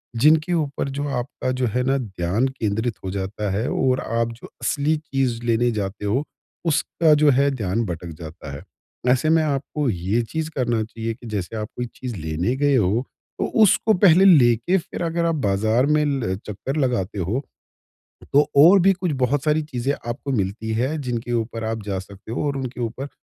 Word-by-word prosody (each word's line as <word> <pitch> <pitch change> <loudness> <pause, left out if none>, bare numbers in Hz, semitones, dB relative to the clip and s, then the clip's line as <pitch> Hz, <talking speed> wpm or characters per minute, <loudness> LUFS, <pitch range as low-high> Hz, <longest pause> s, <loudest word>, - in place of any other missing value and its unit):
जिनके 155 +7 +4
ऊपर 145 -4 -1
जो 145 +2 -3
आपका 130 0 -3
जो 130 -1 0
है 125 +3 0
ना 135 +2 +2
ध्यान 100 +1 -1
केंद्रित 110 -3 -2
हो 95 - -3
जाता 100 +1 -3
है 105 +5 -1
और 130 0 +1
आप 115 0 -1
जो 115 - -12
असली 150 +2 +1
चीज़ 135 -6 -2
लेने 120 +1 +2
जाते 105 -1 -4
हो, 120 +8 +1 0.4
उसका 160 0 +2
जो 150 0 +5
है 140 +2 +3
ध्यान 115 -3 -1
भटक 85 -1 -5
जाता 80 -3 -9
है। - - -9 0.5
ऐसे 130 +4 +2
में 160 0 +4
आपको 145 -1 -1
ये 95 +4 0
चीज़ 160 0 -2
करना 120 -4 0
चाहिए 115 +1 -4
कि 120 +1 -12
जैसे 105 -1 -4
आप 105 - -3
कोई 125 - -2
चीज़ 125 -3 -5
लेने 80 +8 -1
गए 145 -1 +3
हो, 110 +2 +2 0.3
तो - - +1 0.2
उसको 215 +2 +4
पहले 185 -1 +6
लेके 135 - +5
फिर 175 - -5
अगर 170 0 0
आप 165 -1 +1
बाज़ार 110 +6 +2
में 150 0 +2
ल 130 -10 -1
चक्कर 105 +7 -4
लगाते 120 -8 0
हो, 100 +10 -1 0.9
तो 145 +1 +5
और 170 +8 +8
भी 195 +2 +5
कुछ 180 -3 -2
बहुत 135 +3 +1
सारी 155 +1 +2
चीज़ें 135 -2 -2 0.2
आपको 135 +4 -3
मिलती 110 +1 -2
हैं 135 +7 -1
जिनके 120 -2 -3
ऊपर 115 -1 -2
आप 110 -1 -3
जा 95 -2 -2
सकते 100 +3 -10
हो 145 - -1
और 140 - -2
उनके 130 -2 -5
ऊपर 120 +4 -4
125 Hz, 190 wpm, -22 LUFS, 110-145 Hz, 0.9 s, और